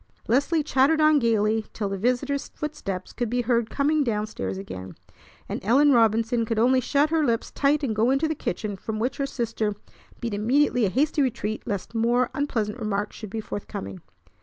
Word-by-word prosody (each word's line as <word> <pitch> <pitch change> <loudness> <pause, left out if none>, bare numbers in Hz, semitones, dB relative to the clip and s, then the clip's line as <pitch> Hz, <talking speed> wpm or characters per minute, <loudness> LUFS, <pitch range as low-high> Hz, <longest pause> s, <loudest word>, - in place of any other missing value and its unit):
Leslie 285 +6 +2
chattered 285 +2 +3
on 305 -1 +5
gayly 220 -2 +2
till 210 - -2
the 195 - -3
visitor's 250 +7 0
footsteps 200 -12 -5
could 240 -3 -2
be 245 +1 0
heard 235 -1 +1
coming 295 +1 +1
down 215 -4 -1
stairs 95 - -5
again, 95 -1 -8 0.5
and - - -5
Ellen 275 +8 +5
Robinson 230 0 +3
could 225 0 -2
only 255 +3 +4
shut 290 +4 +1
her 325 -1 +2
lips 230 -5 0
tight 290 +1 +1
and 230 -6 -1
go 225 +3 +3
into 275 +4 +2
the 315 - 0
kitchen, 205 - -4
from 215 +3 -5
which 240 +4 -1
her 275 - -1
sister 225 -5 -2 0.4
beat 235 -3 -3
immediately 245 +3 +2
a - - +1
hasty 290 - +1
retreat 220 -5 -1
lest 205 0 -4
more 235 +2 +2
unpleasant 240 -6 -2
remarks 210 -2 -2
should 215 - -8
be 225 - -4
forthcoming. 95 - -6
235 Hz, 185 wpm, -25 LUFS, 215-275 Hz, 0.5 s, on